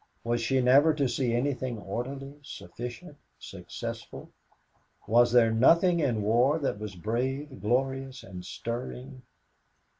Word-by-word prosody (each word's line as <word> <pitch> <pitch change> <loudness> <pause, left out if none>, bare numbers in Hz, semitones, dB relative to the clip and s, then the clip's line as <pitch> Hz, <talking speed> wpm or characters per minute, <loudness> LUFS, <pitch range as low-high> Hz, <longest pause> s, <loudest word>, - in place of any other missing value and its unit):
Was 120 0 0
she 130 +3 +1
never 140 +5 +5
to 140 -3 +1
see 125 -1 -1
anything 130 0 -1
orderly, 135 +7 -6
sufficient, 125 - -8 0.2
successful? - - -8 0.7
Was 120 +2 +4
there 120 -2 +5
nothing 170 +10 +4
in 120 -9 0
war 120 +8 +3
that 135 -9 -2
was 105 -3 -6
brave, 130 - -3
glorious 130 +3 -1
and 90 -2 -9
stirring? 125 +4 -6
125 Hz, 120 wpm, -28 LUFS, 115-135 Hz, 0.7 s, never